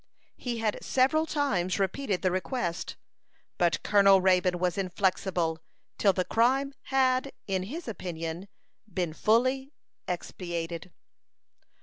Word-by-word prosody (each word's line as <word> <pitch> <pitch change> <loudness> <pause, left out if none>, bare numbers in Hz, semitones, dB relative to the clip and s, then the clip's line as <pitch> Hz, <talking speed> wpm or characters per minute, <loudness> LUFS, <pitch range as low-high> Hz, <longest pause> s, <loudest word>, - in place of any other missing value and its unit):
He 240 -2 -4
had 220 -2 -1
several 310 +5 +2
times 200 - 0
repeated 195 +1 -1
the 185 - +2
request; 185 -2 -2 0.6
but 175 -2 +2
Colonel 195 -1 +6
Raybone 185 -1 +3
was 180 -1 0
inflexible 185 -3 0 0.4
till 200 - +5
the 185 -1 -1
crime 265 +7 +2
had, 265 0 +2
in 190 -2 -1
his 285 - -6
opinion, 170 -3 -5 0.4
been 175 -3 -2
fully 255 - +2 0.3
expiated. 170 -1 -4
195 Hz, 110 wpm, -28 LUFS, 180-255 Hz, 0.6 s, Colonel